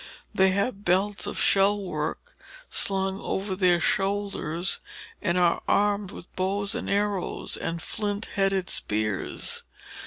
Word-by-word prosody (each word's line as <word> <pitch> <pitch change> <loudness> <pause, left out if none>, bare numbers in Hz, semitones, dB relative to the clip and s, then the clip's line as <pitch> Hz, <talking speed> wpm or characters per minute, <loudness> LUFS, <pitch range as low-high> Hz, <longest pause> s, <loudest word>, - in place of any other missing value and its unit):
They 190 0 +5
have 200 +2 0
belts 195 +3 +2
of - - -3
shell 200 +1 +4
work 180 - -4 0.4
slung 195 0 0
across 190 -1 -2
their 180 -2 +5
shoulders, 195 -3 0 0.4
and 180 -3 +1
are 175 -1 +3
armed 205 -1 +2
with 180 - -11
bows 195 +2 0
and - - -3
arrows 200 -2 0
and 170 0 -3
flint 205 0 -2
headed 195 -2 +2
spears. 105 -2 -1
195 Hz, 125 wpm, -27 LUFS, 180-205 Hz, 0.4 s, They